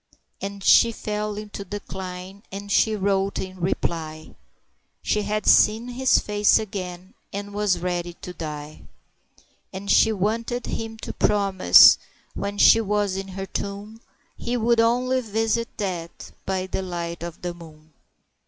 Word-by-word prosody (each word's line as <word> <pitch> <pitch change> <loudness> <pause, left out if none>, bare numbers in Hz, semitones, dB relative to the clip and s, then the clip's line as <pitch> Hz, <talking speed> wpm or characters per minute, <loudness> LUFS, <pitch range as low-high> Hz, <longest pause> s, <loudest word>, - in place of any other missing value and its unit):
And 200 0 -6
she 230 - +6
fell 210 -1 -4
into 210 -1 -7
decline, 190 -1 -7
and 200 +1 -7
she 220 +1 +3
wrote 195 -1 0
in 185 0 -6
reply, 160 -3 -3 0.7
"She 210 - +1
had 210 0 -2
seen 225 +3 +4
his 255 +1 +3
face 210 0 +3
again 185 -2 -6 0.2
and 205 0 -6
was 205 -3 +1
ready 175 0 -3
to 180 +1 -9
die"; 150 -2 -7 0.9
And 195 +1 -4
she 225 - +5
wanted 225 +4 -2
him 225 0 -5
to - - -5
promise, 195 -2 +6 0.3
when 200 0 -4
she 225 - +7
was 205 -2 0
in 195 0 -4
her 195 0 -6
tomb, 200 +3 -6 0.3
He 245 +1 -3
would 235 0 +2
only 250 +3 +2
visit 225 +1 -1
that 175 -5 -5 0.2
by 190 -1 -1
the 190 - -3
light 170 -2 -5
of 170 0 -8
the 175 -1 -3
moon. 160 -2 -15
200 Hz, 145 wpm, -24 LUFS, 180-215 Hz, 0.9 s, she